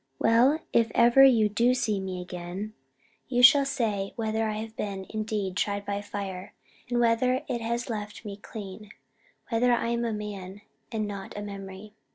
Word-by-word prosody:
Well, 240 +6 +4 0.2
if 230 -2 +3
ever 240 +3 +7
you 235 -5 +6
do 235 +5 +2
see 215 -5 0
me 185 -1 -4
again 180 +4 -6 0.5
you 245 -2 +1
shall 280 +2 +8
say 215 -7 -1
whether 220 -1 -1
I - - -2
have 220 +1 -6
been, 195 -3 -4
indeed, 215 -3 -2
tried 205 0 -1
by 200 0 -2
fire, 200 -2 -6 0.3
and 240 -1 +1
whether 240 +2 +2
it 235 - -2
has 235 +1 -2
left 210 -1 -5
me 200 -1 -5
clean 205 -1 -9 0.6
whether 245 +1 +2
I 235 -1 +1
am 235 0 0
a 230 - -1
man 205 -2 -6 0.3
and 215 -2 -2
not 200 -1 -7
a 205 - -4
memory. 200 0 -8
215 Hz, 175 wpm, -27 LUFS, 200-235 Hz, 0.6 s, shall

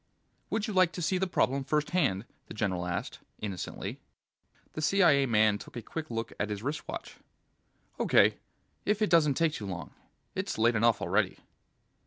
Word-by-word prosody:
"Would 220 -1 0
you 215 - -4
like 185 -3 +4
to 180 - -5
see 185 +3 +1
the 190 - +1
problem 135 -6 +1
first 150 +2 0
hand?" 120 - +1 0.2
the - - -9
general 95 -4 -1
asked, 85 - -4 0.2
innocently. 100 -5 -5 0.7
The 155 - -4
CIA 155 -6 +4
man 110 -2 +3
took - - -12
a 120 - -5
quick 155 +6 -6
look 115 -1 -3
at 105 - -1
his 105 0 -4
wristwatch. 145 +4 -5 0.8
"O.K., - - +4 0.4
if 210 +1 +1
it 210 - +1
doesn't 150 -5 +5
take 165 0 +2
too 105 -9 -5
long. 90 -3 -6 0.4
It's - - -3
late 115 +2 +4
enough 115 -1 +3
already." - - +1
135 Hz, 170 wpm, -30 LUFS, 105-165 Hz, 0.8 s, doesn't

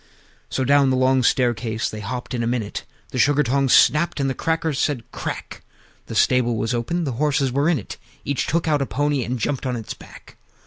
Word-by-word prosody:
III. - - -31
So 130 - -1
down 140 0 +4
the 130 - +2
long 130 0 +3
staircase 115 -3 +1
they 110 - -6
hopped 125 +6 -5
in 120 - -1
a 115 - 0
minute; 115 -4 -3 0.3
The 130 - -3
Sugar 145 +3 +4
tongs 135 +1 +2
snapped, 150 +1 +4
and 140 - +1
the 135 - 0
Crackers 160 -1 -1
said 140 -6 0
"Crack!" - - -6 0.5
The - - -6
stable 120 -2 +3
was 115 +3 -1
open; 125 +9 -1
the 140 - -2
horses 140 -3 +2
were 140 +5 +2
in 170 - +3
it: 105 - -7 0.3
Each 140 -2 -1
took 165 0 0
out 150 -2 +2
a 135 - -1
pony, 145 -1 0
and 125 +2 -3
jumped 130 +4 -2
on 125 - -1
his 110 -3 -5
back. - - -15
130 Hz, 220 wpm, -22 LUFS, 120-145 Hz, 0.5 s, down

